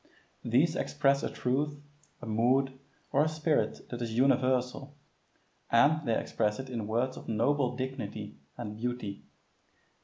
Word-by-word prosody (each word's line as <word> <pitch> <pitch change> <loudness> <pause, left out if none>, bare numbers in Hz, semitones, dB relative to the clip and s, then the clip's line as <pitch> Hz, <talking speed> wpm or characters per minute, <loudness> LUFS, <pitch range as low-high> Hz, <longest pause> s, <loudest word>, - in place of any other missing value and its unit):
These 140 +8 +3
express 140 -4 +2
a - - -2
truth, 145 +4 -1 0.4
a - - -4
mood, 125 +5 +2 0.4
or 140 - +4
a 155 - +1
spirit 155 0 0
that 120 -1 -4
is 115 -1 -3
universal, 130 +1 +2 0.7
and 145 +5 +4
they 115 - +3
express 105 0 0
it 130 -1 -6
in 115 -4 -3
words 120 +4 0
of - - -10
noble 125 +4 +1
dignity 110 -6 -5 0.2
and 105 -4 -5
beauty. 115 -3 -4
130 Hz, 140 wpm, -30 LUFS, 115-140 Hz, 0.7 s, or